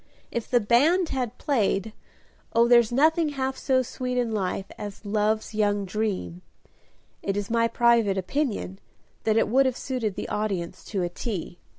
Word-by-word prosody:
If 235 - -4
the 245 - +4
band 305 - +3
had 250 -3 -3
played 215 -6 0 0.6
"Oh, 235 0 +5
there's 235 -2 +5
nothing 315 +5 +3
half 265 -2 -2
so 260 -1 +1
sweet 250 +1 -4
in 240 -2 0
life 195 -2 -2
As 205 0 -8
love's 215 +2 0
young 205 -1 +1
dream 185 - -3 0.4
" - - -35 0.3
it 195 0 -2
is 205 +1 -3
my 230 0 +3
private 230 -4 +3
opinion 195 -1 -2 0.5
that 220 0 +3
it - - +3
would 265 +4 +4
have 255 - -2
suited 235 -7 -3
the - - -4
audience 185 -4 -3
to 195 -4 -2
a 175 - -1
T. 175 -2 -5
220 Hz, 170 wpm, -26 LUFS, 200-250 Hz, 0.6 s, Oh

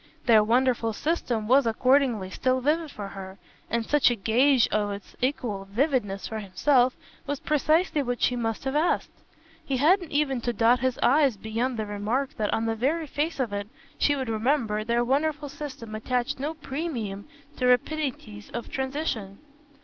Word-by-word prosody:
Their 220 -3 +6
wonderful 235 0 +2
system 240 -6 -1
was 260 +1 +5
accordingly 240 -4 +2
still 255 +4 +1
vivid 305 +4 0
for 205 -7 -7
her; 190 -1 -9 0.3
and 235 -1 -1
such 295 +1 +4
a 240 - 0
gage 240 +5 +3
of 210 -1 0
its 200 -1 -8
equal 240 -7 -1
vividness 205 -3 -1
for 220 - -4
himself 245 +6 +2 0.3
was 285 -1 -2
precisely 305 +2 +2
what 245 -2 -2
she 250 - +2
must 225 -2 -2
have 270 +1 -2
asked. 315 +4 +1 0.5
He 270 - -1
hadn't 345 +5 +3
even 285 -4 +1
to 240 +1 -1
dot 235 +3 +4
his 260 0 0
i's 270 -3 +4
beyond 230 +4 -2
the 215 - -2
remark 210 +7 -2
that 210 -1 0
on 225 - 0
the 225 - 0
very 285 +9 0
face 300 +2 -2
of 240 -6 -1
it, 200 0 -3 0.3
she 290 - +3
would 265 -2 -3
remember, 225 -1 0
their 235 +2 +1
wonderful 295 +3 0
system 275 -6 -8
attached 245 +4 -2
no 300 +4 -3
premium 265 -10 -4 0.3
to 250 - +1
rapidities 250 -5 -1
of 240 - -5
transition. 265 -7 -3
250 Hz, 170 wpm, -26 LUFS, 220-285 Hz, 0.5 s, Their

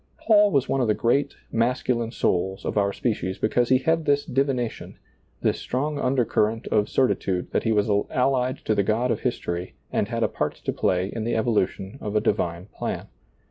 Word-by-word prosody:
Paul 210 -2 +5
was 140 -6 +1
one 135 - +1
of 120 - +1
the 105 - +2
great, 140 +4 +1 0.2
masculine 120 0 0
souls 95 -4 -1
of - - -2
our 100 -1 +2
species 100 -4 -2
because 120 +2 +1
he 130 - +6
had 160 +4 +1
this 145 0 +2
divination, 130 -3 -2 0.4
this - - +1
strong 145 +3 -2
undercurrent 115 -4 +1
of 105 -1 +2
certitude 95 -8 0
that - - 0
he 115 - +2
was 105 -1 +2 0.2
allied 130 0 +1
to 110 - +2
the 100 - +2
God 115 +5 +1
of - - 0
history 90 -8 -3 0.2
and - - 0
had - - -1
a - - +4
part - - -2
to - - -4
play 90 0 +1
in 115 - -3
the 115 +1 -1
evolution 110 0 -1
of 105 0 -4
a - - +5
divine 90 -5 -1
plan. 105 - -5
115 Hz, 190 wpm, -24 LUFS, 105-130 Hz, 0.4 s, he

